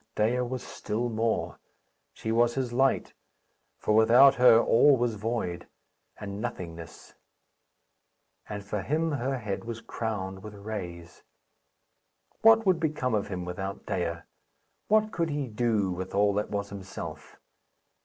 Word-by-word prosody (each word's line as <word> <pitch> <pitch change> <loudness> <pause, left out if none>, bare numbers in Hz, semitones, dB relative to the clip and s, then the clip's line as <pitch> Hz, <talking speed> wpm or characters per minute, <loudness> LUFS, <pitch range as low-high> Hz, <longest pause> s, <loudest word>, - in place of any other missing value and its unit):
Dea 115 +4 +1
was 125 0 -4
still 115 +3 -3
more 115 0 -1 0.5
she 110 - -5
was 120 +1 +3
his 130 -3 -2
light, 135 +2 +1 0.6
for 105 - 0
without 120 +5 +7
her 125 -3 +6
all 135 +4 +5
was 120 -1 0
void, 105 -5 -3 0.5
and 100 +1 -6
nothingness; 85 -8 -7 1.4
and 105 -1 -5
for 105 0 -3
him 160 - 0
her 135 -1 -1
head 105 -5 -4
was 115 0 -6
crowned 95 -5 -4
with 105 0 -9
rays. 90 -4 -7 1.2
What 225 0 +6
would 185 -3 +3
become 150 -6 -1
of 105 -2 0
him 90 -3 -5
without 95 +3 -5
Dea? 85 -4 -2 0.7
What 215 0 +3
could 170 -5 -1
he 145 -1 -2
do 110 -4 0
with 95 +2 -5
all 100 0 +3
that 105 +1 -1
was 100 0 -3
himself? 100 -2 -8
110 Hz, 135 wpm, -28 LUFS, 100-125 Hz, 1.4 s, without